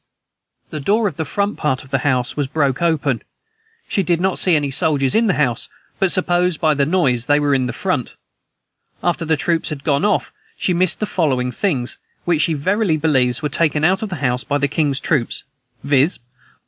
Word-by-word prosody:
The 155 Hz, -, -4 dB
door 210 Hz, +9 st, +2 dB
of 185 Hz, -, -5 dB
the 160 Hz, -, -2 dB
front 200 Hz, +7 st, -1 dB
part 135 Hz, -4 st, -1 dB
of 130 Hz, -, -17 dB
the 135 Hz, -, +1 dB
house 125 Hz, -2 st, 0 dB
was 145 Hz, -2 st, -1 dB
broke 140 Hz, -2 st, 0 dB
open; 150 Hz, -7 st, +1 dB, 0.7 s
she 195 Hz, -, 0 dB
did 175 Hz, -2 st, +1 dB
not 190 Hz, +1 st, 0 dB
see 180 Hz, -3 st, +4 dB
any 145 Hz, -2 st, 0 dB
soldiers 135 Hz, -1 st, +1 dB
in 225 Hz, +1 st, +3 dB
the 190 Hz, -, +2 dB
house, 125 Hz, -6 st, 0 dB, 0.3 s
but 190 Hz, -2 st, +2 dB
supposed, 180 Hz, -2 st, +1 dB
by 155 Hz, -2 st, +3 dB
the 140 Hz, -1 st, +1 dB
noise, 135 Hz, -9 st, +1 dB
they 145 Hz, +1 st, +4 dB
were 145 Hz, -1 st, +1 dB
in 130 Hz, -2 st, +1 dB
the -, -, -2 dB
front. -, -, -1 dB, 0.9 s
After 175 Hz, -1 st, 0 dB
the 160 Hz, -1 st, +1 dB
troops 165 Hz, +2 st, 0 dB
had 145 Hz, -3 st, -6 dB
gone 145 Hz, +1 st, +1 dB
off, 210 Hz, -2 st, 0 dB, 0.2 s
she 180 Hz, -, 0 dB
missed 175 Hz, +2 st, +1 dB
the -, -, +1 dB
following 130 Hz, -10 st, 0 dB
things, 135 Hz, -8 st, -2 dB, 0.3 s
which, 170 Hz, -3 st, +2 dB
she 160 Hz, -, +1 dB
verily 185 Hz, +3 st, +1 dB
believes, 130 Hz, -4 st, +1 dB
were 150 Hz, -, 0 dB
taken 150 Hz, 0 st, +1 dB
out 190 Hz, +4 st, +3 dB
of 220 Hz, -, -3 dB
the 185 Hz, -, -4 dB
house 125 Hz, -4 st, -1 dB
by 145 Hz, -, 0 dB
the 140 Hz, 0 st, +1 dB
king's 145 Hz, -1 st, 0 dB
troops, 140 Hz, -8 st, -1 dB, 0.4 s
viz. 140 Hz, +4 st, +2 dB
150 Hz, 205 wpm, -19 LUFS, 135-175 Hz, 0.9 s, see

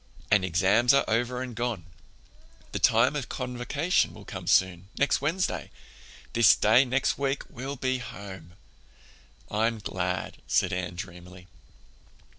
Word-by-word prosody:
"And 105 Hz, -3 st, +5 dB
exams 95 Hz, +8 st, +3 dB
are 140 Hz, -, +3 dB
over 125 Hz, +3 st, 0 dB
and 125 Hz, -3 st, -7 dB
gone—the 90 Hz, -10 st, -8 dB
time 115 Hz, +6 st, +4 dB
of 140 Hz, -4 st, -4 dB
Convocation 130 Hz, +7 st, -1 dB
will -, -, -12 dB
come -, -, -8 dB
soon—next 95 Hz, +9 st, +1 dB
Wednesday. 165 Hz, +6 st, -1 dB, 0.6 s
This 115 Hz, -2 st, +6 dB
day 115 Hz, +5 st, +4 dB
next 130 Hz, +2 st, 0 dB
week 140 Hz, 0 st, -1 dB
we'll 135 Hz, +3 st, -5 dB
be 130 Hz, -1 st, -1 dB
home." 100 Hz, -8 st, -9 dB, 1.0 s
"I'm 115 Hz, +2 st, +1 dB
glad," 90 Hz, -3 st, -3 dB
said -, -, +2 dB
Anne 90 Hz, -1 st, -3 dB
dreamily. 90 Hz, 0 st, -9 dB
115 Hz, 120 wpm, -27 LUFS, 95-130 Hz, 1.0 s, This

